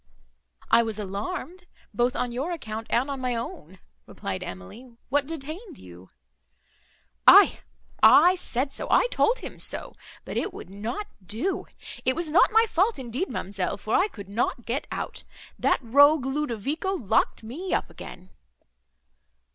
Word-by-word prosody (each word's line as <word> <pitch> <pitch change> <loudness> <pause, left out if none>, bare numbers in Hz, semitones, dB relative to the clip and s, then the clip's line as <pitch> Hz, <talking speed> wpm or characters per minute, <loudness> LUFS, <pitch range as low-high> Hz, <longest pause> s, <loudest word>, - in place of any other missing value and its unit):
"I 230 - +7
was 220 -2 -3
alarmed 215 - -5 0.3
both 240 +4 +1
on 245 - -1
your 270 +9 -3
account 225 -8 -6
and 245 +4 +1
on 275 - -4
my 250 -1 -1
own," 190 -6 -7 0.3
replied - - -5
Emily—"What 240 - -5
detained 320 - -7
you?" 90 +1 -14 1.2
"Aye, - - +8 0.4
I 350 +5 +8
said 275 -6 -2
so, - - -5
I - - +5
told 475 +2 +3
him - - -9
so; - - -3 0.3
but - - -5
it 380 - -2
would 190 - -10
not 225 - -4 0.2
do. 235 - -3 0.4
It 260 - +1
was 335 -2 -2
not 335 - +5
my 445 +1 +5
fault, 415 +3 +1
indeed, 260 - -3
ma'amselle, 190 -1 -3
for 215 +3 -4
I 375 - +4
could 200 - -11
not 230 +3 -2
get 250 +5 -2
out. - - -5 0.4
That - - +1
rogue 285 +4 +5
Ludovico 290 - -2
locked 230 - 0
me 315 +12 -6
up - - 0
again." 185 +1 -11
255 Hz, 145 wpm, -26 LUFS, 220-330 Hz, 1.2 s, Aye